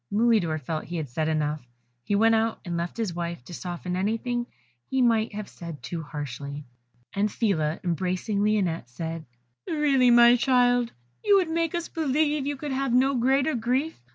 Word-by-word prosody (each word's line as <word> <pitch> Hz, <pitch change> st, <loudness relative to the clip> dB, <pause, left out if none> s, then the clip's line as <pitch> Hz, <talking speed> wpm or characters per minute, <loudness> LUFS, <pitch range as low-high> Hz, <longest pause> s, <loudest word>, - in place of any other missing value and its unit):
Mulidor 210 Hz, -7 st, +2 dB
felt 155 Hz, +3 st, -4 dB
he 175 Hz, -, -5 dB
had 155 Hz, -4 st, -4 dB
said 155 Hz, +6 st, -1 dB
enough; 155 Hz, -1 st, 0 dB, 0.4 s
he 205 Hz, -, 0 dB
went 225 Hz, +2 st, +4 dB
out 225 Hz, 0 st, +1 dB
and 175 Hz, -1 st, -3 dB
left 170 Hz, +4 st, -3 dB
his 220 Hz, -6 st, -2 dB
wife 170 Hz, -6 st, -5 dB
to -, -, -10 dB
soften 180 Hz, +1 st, -4 dB
anything 230 Hz, +5 st, -1 dB, 0.4 s
he 265 Hz, -, 0 dB
might 230 Hz, -3 st, +2 dB
have 210 Hz, -1 st, -5 dB
said 165 Hz, -6 st, -9 dB
too 165 Hz, +6 st, -4 dB
harshly; 145 Hz, -1 st, -6 dB, 0.5 s
and 205 Hz, +1 st, 0 dB
Phila, 165 Hz, -9 st, 0 dB
embracing 185 Hz, +4 st, -1 dB
Lionette, 185 Hz, -, 0 dB
said, 160 Hz, +5 st, -5 dB, 0.4 s
"Really, 280 Hz, -5 st, +3 dB
my 240 Hz, 0 st, +7 dB
child, 245 Hz, -1 st, +3 dB, 0.3 s
you 410 Hz, -, +5 dB
would 360 Hz, -4 st, +1 dB
make 330 Hz, 0 st, 0 dB
us 340 Hz, -1 st, -2 dB
believe 300 Hz, -1 st, 0 dB
you 290 Hz, -1 st, -2 dB
could 290 Hz, +1 st, -5 dB
have 265 Hz, -1 st, -1 dB
no 265 Hz, +2 st, +4 dB
greater 265 Hz, +4 st, +2 dB
grief. 255 Hz, +7 st, -1 dB
215 Hz, 175 wpm, -26 LUFS, 170-255 Hz, 0.5 s, my